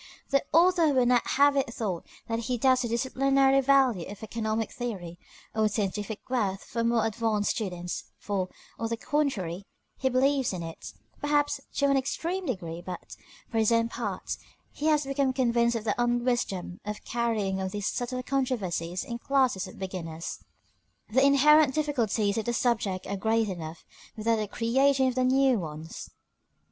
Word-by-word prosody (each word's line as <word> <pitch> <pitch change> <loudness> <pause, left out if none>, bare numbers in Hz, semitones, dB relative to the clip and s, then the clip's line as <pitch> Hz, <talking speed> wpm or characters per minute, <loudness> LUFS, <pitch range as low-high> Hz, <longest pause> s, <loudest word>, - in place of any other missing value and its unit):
The 275 -1 +3
author 340 0 +5
would 255 -3 +3
not 245 -1 +3
have 285 0 +5
it 270 -4 +1
thought 200 -8 -3 0.2
that 225 0 -1
he 245 +2 -2
doubts 255 +1 +4
the 240 - -1
disciplinary 270 +3 +3
value 260 -9 +3
of 205 +1 -9
economic 220 0 -2
theory 185 -9 -5 0.3
or 220 0 +2
its 210 -1 0
scientific 205 +1 -3
worth 205 -7 -1
for 230 - -3
more 230 -1 +2
advanced 220 -1 0
students, 180 -5 -4
for, 190 -3 -2 0.3
on 225 -1 -2
the 230 - -2
contrary, 205 - -1 0.4
he 265 - +2
believes 265 -1 +2
in 175 -2 -4
it, 165 0 -8 0.3
perhaps 290 -1 +1
to 280 - +2
an 275 -1 +4
extreme 340 +7 -2
degree; 170 -8 -4
but, 180 -1 -7 0.4
for 225 - +1
his 220 +1 +3
own 230 0 +3
part, - - -4 0.3
he 300 - -3
has 300 -1 +4
become 275 -1 +1
convinced 235 -2 +2
of 225 - -2
the 210 -2 +1
unwisdom 240 -7 0
of 210 0 -6
carrying 215 -5 -1
on 190 - -1
these 205 +1 -4
subtle 255 +2 -2
controversies 210 -11 -1
in 240 -3 -5
classes 260 -7 +1
of - - -12
beginners. 170 -4 -5 0.7
The 260 +4 +4
inherent 280 0 +6
difficulties 230 -8 +1
of 220 - -4
the 240 - 0
subject 220 -6 0
are 200 - -3
great 220 +1 +1
enough, 165 -3 -7 0.3
without 225 +1 +1
the 215 -1 -2
creation 265 +5 +2
of 255 - -5
new 255 -1 +3
ones. 155 -1 -7
235 Hz, 165 wpm, -28 LUFS, 200-265 Hz, 0.7 s, inherent